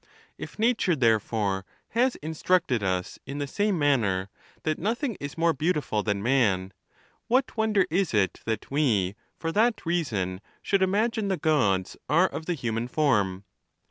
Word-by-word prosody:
If - - -9
natnre, 220 - +2
therefore, 110 -4 +1 0.3
has 245 +3 +2
instructed 160 - +1
us 95 -2 -2
in 140 +1 -5
the 145 - -2
same 205 +6 0
manner, 110 - +1 0.3
that 155 -1 -1
nothing 230 - -1
is 145 +2 -6
more 165 0 +3
beautiful 150 -8 0
than 105 -1 -1
man, 100 -7 +2 0.5
what 255 +2 +1
wonder 220 -3 +2
is 190 +2 +1
it 100 -5 +1
that 110 +3 -3
we, 110 -11 +2 0.2
for 165 - -3
that 225 +4 +1
reason, 110 - -1 0.2
should 195 -2 +1
imagine 215 +3 +1
the 190 -2 0
Gods 115 - +1
are 170 +5 +5
of 160 - -7
the 175 - 0
human 120 -4 -2
form? 105 -10 +1
145 Hz, 150 wpm, -26 LUFS, -, 0.5 s, are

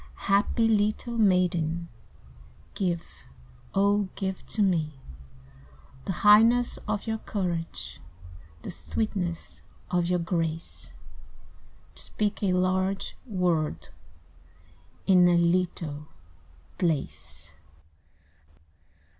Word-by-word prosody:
"Happy 200 +3 +3
little 215 +2 +1
maiden, 175 -5 +2 0.9
Give, 170 - -3 0.5
O 200 0 +3
give 190 -2 -3
to 215 - +1
me 165 -6 +1 1.1
The - - -1
highness 230 +4 +6
of 210 -1 -1
your 220 -1 -2
courage, 170 - -4 0.6
The - - -5
sweetness 185 -6 -3 0.3
of 175 -2 +2
your 180 0 +2
grace, 165 -1 -3 1.0
To - - -8
speak 210 -1 -2
a 195 -3 +2
large 185 +1 0
word, 170 - 0 1.2
in 180 -2 +6
a 175 -1 +4
Little 170 -4 0 0.7
place." 75 - -2
180 Hz, 85 wpm, -27 LUFS, 165-205 Hz, 1.2 s, highness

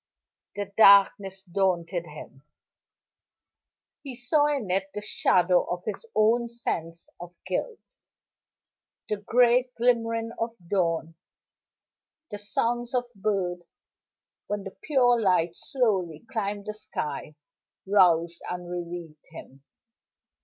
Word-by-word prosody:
The 200 -1 -5
darkness 195 -2 +5
daunted 175 -2 -1
him; 150 -3 -11 1.6
he 270 -4 -7
saw 275 +5 +2
in 270 -10 -1
it 190 +1 +1
the 210 - -3
shadow 180 -3 +3
of 175 0 -4
his 220 - -5
own 230 +3 +3
sense 170 -8 -4
of 175 0 -10
guilt. 435 - -2 1.3
The 210 - 0
gray 245 +4 +3
glimmering 230 -1 +1
of 230 0 -2
dawn, 165 -3 0 1.2
the 205 - -5
songs 240 +4 -1
of 245 0 +1
birds 190 -3 -1 0.9
when 205 -1 -3
the 195 - -9
pure 245 -5 +3
light 175 -4 +2
softly 195 - -1
climbed 205 -4 -3
the 215 - -4
sky, 150 -7 -5 0.5
roused 175 -4 +3
and 180 0 -5
relieved 170 -3 -7
him. 135 +1 -13
200 Hz, 110 wpm, -26 LUFS, 175-230 Hz, 1.6 s, darkness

